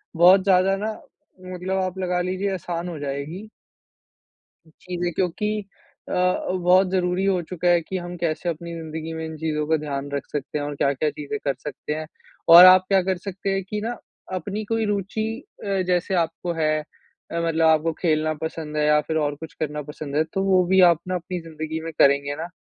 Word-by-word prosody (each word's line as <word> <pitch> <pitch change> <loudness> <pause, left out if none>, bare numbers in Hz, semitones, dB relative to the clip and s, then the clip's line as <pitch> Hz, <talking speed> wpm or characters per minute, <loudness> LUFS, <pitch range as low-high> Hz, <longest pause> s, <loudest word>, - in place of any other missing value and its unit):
बहुत 180 +3 +7
ज़्यादा 190 0 +4
ना 215 +2 -2 0.6
मतलब 185 +2 -2
आप 185 0 -4
लगा 180 -1 0
लीजिए 185 +2 -1
आसान 175 -1 -4
हो 165 -3 -6
जाएगी। 145 +8 -5 1.2
चीजें 175 +2 -4
क्योंकि 200 +5 -1 0.5
अ - - -3
अ, 180 0 +1
बहुत 185 +1 +3
ज़रूरी 180 0 0
हो 195 -2 +2
चुका 180 -1 -1
है 175 -1 +5
कि 185 +3 -5
हम 175 0 -6
कैसे 170 0 -2
अपनी 170 +1 -4
ज़िंदगी 160 0 -6
में 160 0 -4
इन 160 0 -6
चीज़ों 150 -1 -1
का 160 +1 +3
ध्यान 145 -2 -4
रख 140 - -3
सकते 145 0 -3
हैं। 145 - -3
और 145 0 -4
क्या-क्या 140 +2 +1
चीज़ें 150 +8 -5
कर 140 - +1
सकते 150 +2 -6
हैं 155 0 -5 0.5
और 175 +1 +12
आप 185 0 +8
क्या 195 -1 +4
कर 190 +1 0
सकते 195 +1 -4
हैं, 195 0 0
कि 210 +2 -4
ना 240 +1 -3 0.4
अपनी 200 +4 -4
कोई 225 +1 -1
रूचि 205 +1 -1 0.4
अ, 195 -2 0
जैसे 180 +1 +1
आपको 170 0 -1
है 155 0 +2
अ, 165 +2 -9
मतलब 165 -1 +2
आपको 160 +1 +3
खेलना 155 -2 +1
पसंद 160 -1 -5
है 150 0 +2
या 150 0 +5
फ़िर 160 +2 -4
और 145 -1 0
कुछ 160 +2 -9
करना 150 -1 -2
पसंद 150 0 -7
है, 155 - +3
तो 180 +4 -3
वो 185 -2 +4
भी 190 +1 +4
आप 170 - +1
ना 185 - -1
अपनी 180 +1 -4
ज़िंदगी 160 0 -5
में 165 - -5
करेंगे 140 +1 +4
ना, 165 +3 -5
170 Hz, 200 wpm, -23 LUFS, 155-185 Hz, 1.2 s, और